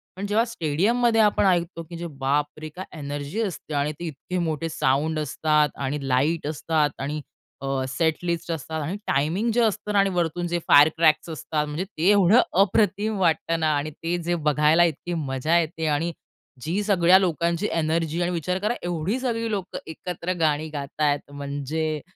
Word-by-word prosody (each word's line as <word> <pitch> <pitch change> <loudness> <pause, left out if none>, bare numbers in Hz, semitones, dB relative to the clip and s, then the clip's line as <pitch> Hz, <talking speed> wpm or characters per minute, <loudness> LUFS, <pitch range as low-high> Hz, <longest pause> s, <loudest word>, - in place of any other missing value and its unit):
पण 195 - -4
जेव्हा 215 +3 +3
स्टेडियममध्ये 225 +6 +1
आपण 205 -1 +3
ऐकतो 170 -2 +1
की 170 0 -6
बापरे! 145 +3 -1
काय 185 +5 -8
एनर्जी 145 +7 -4
असते 180 -6 -4
आणि 145 +1 0
ते 175 - -5
इतके 170 +5 -5
मोठे 165 -1 -2
साउंड 155 +3 0
असतात 150 0 +1
आणि 135 0 -3
लाईट 145 +5 +1
असतात 155 0 0
आणि 150 +2 -3 0.4
अ, - - -3 0.2
सेट 155 +4 +1
लिस्ट 170 0 -2
असतात 160 0 -4
आणि 165 +7 -3
टायमिंग 165 - +1
जे 240 - +3
असतं 210 -2 0
ना 200 - +4
आणि 195 0 +3
वरतून 175 -1 -1
जे 175 0 -1
फायर 145 +2 +8
क्रॅक्स 160 0 +3
असतात 155 -1 -2
म्हणजे 150 +5 -3
ते 185 -2 0
एवढं 205 +3 +6 0.2
अप्रतिम 205 +1 +2
वाटत 165 -2 +1
ना 160 - +1
आणि 150 +2 -3
ते 170 +4 -3
जे 175 +1 0
बघायला 150 +3 +4
इतकी 175 +1 -1
मजा 155 +1 0
येते 160 0 -2
आणि 165 +3 -1 0.5
जी 175 +9 -1
सगळ्या 190 -2 +5
लोकांची 170 +1 0
एनर्जी 165 +1 0
आणि 175 +1 0
विचार 180 +2 -1
करा 210 +4 0
एवढी 175 +7 -1
सगळी 230 -3 -1
लोकं 195 -3 -3
एकत्र 180 +2 -4
गाणी 155 -1 +1
गात 145 0 -6
आहेत. 145 -1 +1
म्हणजे 145 +2 -3
165 Hz, 175 wpm, -24 LUFS, 150-185 Hz, 0.5 s, फायर